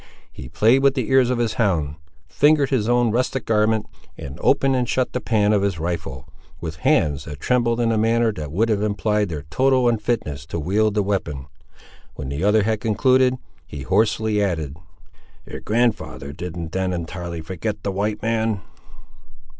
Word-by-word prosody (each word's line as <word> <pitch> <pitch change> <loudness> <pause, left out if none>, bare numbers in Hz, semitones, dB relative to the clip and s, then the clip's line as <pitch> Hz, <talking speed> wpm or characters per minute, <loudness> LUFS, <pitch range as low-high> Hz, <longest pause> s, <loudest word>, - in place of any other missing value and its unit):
He 65 - -10
played 120 +5 +3
with 140 0 +3
the 130 -4 -2
ears 130 -2 +5
of 125 - 0
his 115 -2 0
hound; 80 -9 0 0.3
fingered 145 - +3
his 120 -4 +1
own 120 -2 +3
rustic 125 +2 -1
garment, 110 0 +2 0.3
and - - -8
opened 135 -1 +3
and 125 -2 -1
shut 130 -1 0
the 125 - -2
pan 105 -3 +2
of 105 - +2
his 100 -3 0
rifle, 80 -5 -4 0.3
with 80 -2 -6
hands 75 -1 +1
that 75 -2 -8
trembled 120 -2 +1
in 115 -1 +2
a 110 - +1
manner 115 +1 +2
that 75 -6 -6
would 105 +8 +1
have 105 -2 +1
implied 105 -1 0
their 75 -4 -5
total 130 +3 +3
unfitness 105 - -1
to 85 - -4
wield 105 +6 +1
the 105 - +2
weapon. 85 -9 -2 0.7
When 65 - -6
the 70 +5 -3
other 105 +1 +4
had 110 0 -1
concluded, 130 +3 +3 0.3
he 70 -2 -7
hoarsely 110 - +1
added— 80 -8 -2 0.7
"Your - - -8
grand'ther 110 -11 -1
didn't 85 0 -6
then 95 0 -1
entirely 85 -1 -5
forget 95 +5 -5
the 100 - -1
white 105 +2 -2
man!" 110 -2 0
105 Hz, 175 wpm, -22 LUFS, 85-115 Hz, 0.7 s, ears